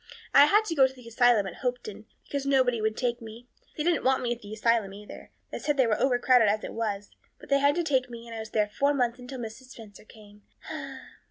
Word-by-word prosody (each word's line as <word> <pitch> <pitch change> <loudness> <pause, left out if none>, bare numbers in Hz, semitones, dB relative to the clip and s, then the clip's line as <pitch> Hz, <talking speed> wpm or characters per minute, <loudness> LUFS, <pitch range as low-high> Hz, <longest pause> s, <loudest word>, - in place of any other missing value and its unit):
I 280 - +8
had 420 +8 +3
to 340 - -2
go 270 -4 +5
to 260 - -12
the 250 -2 -14
asylum 230 -2 +3
at 190 - -7
Hopeton, 250 - -4 0.2
because 280 -1 -4
nobody 255 -4 +2
would 220 0 -1
take 240 -1 -1
me. 225 +2 -11 0.3
They 300 - -1
didn't 340 -2 +1
want 260 0 +2
me 240 -1 0
at 240 - -12
the 205 - -11
asylum, 220 -2 0
either; 210 +1 -11 0.2
they - - -5
said 295 -1 -1
they 260 - +4
were 220 -2 0
over 260 -2 +3
crowded 245 -3 +4
as 215 +1 0
it - - -6
was. 205 -3 -3 0.3
But - - -15
they 280 0 +3
had 285 +1 +3
to 345 - 0
take 260 -5 0
me 235 -1 -9
and 230 -1 -9
I - - -5
was 220 0 -7
there 215 -1 +1
four 280 +7 0
months 245 -2 0
until 250 +2 -8
Mrs. 235 +2 -8
Spencer 220 -6 -13
came." 210 -2 -17
245 Hz, 250 wpm, -27 LUFS, 220-265 Hz, 0.3 s, I